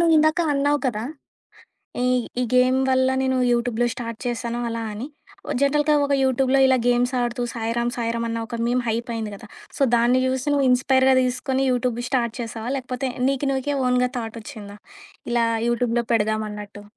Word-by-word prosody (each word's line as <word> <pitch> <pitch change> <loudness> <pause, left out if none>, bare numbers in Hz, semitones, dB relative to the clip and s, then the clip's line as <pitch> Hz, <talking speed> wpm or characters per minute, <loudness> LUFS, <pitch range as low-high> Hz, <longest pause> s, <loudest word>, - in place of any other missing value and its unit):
నువ్వు 335 -1 +4
ఇందాక 310 +2 +3
అన్నావు 285 +1 +2
కదా! 220 -3 -2 1.0
ఈ - - +1 0.4
ఈ - - +2
గేమ్ 255 +1 +4
వల్ల 260 0 +3
నేను 260 0 +1 0.2
యూట్యూబ్‌లో 240 0 +1
స్టార్ట్ 230 -2 -6
చేశాను 240 -1 -3
అలా 230 0 -3
అని. 220 +6 -5 0.5
జనరల్‌గా 295 +2 +3
ఒక 280 - -1
యూట్యూబ్‌లో 265 +1 +2
ఇలా 260 - +4
గేమ్సాడుతూ 245 0 +1
సాయిరాం! 235 +1 -1
సాయిరాం! 230 0 -2
అన్న 230 - -2
ఒక 235 -1 -6
మీమ్ 250 +1 +1
హైపయింది 225 -1 -3
కదా! 220 +1 -13 0.3
సో - - +1
దాన్ని 240 +2 +3
చూసి 260 +1 -1
నువ్వు 280 -2 +2
ఇన్‌స్పైర్‌గా 260 +1 +4
తీసుకొని 255 +1 -1
యూట్యూబ్ 245 -1 0
స్టార్ట్ 235 -4 0
చేశావా? 225 +1 -5
లేకపోతే 255 0 -3 0.2
నీకు 275 +1 -1
నీకే 270 +2 -1
ఓన్‌గా 250 0 +2
థాటొచ్చిందా? 220 -2 -8 0.5
ఇలా 235 -1 +2 0.2
యూట్యూబ్‌లో 240 0 0
పెడదాం 215 0 +1
అన్నట్టు? 205 0 -9
245 Hz, 155 wpm, -23 LUFS, 230-260 Hz, 1.0 s, నువ్వు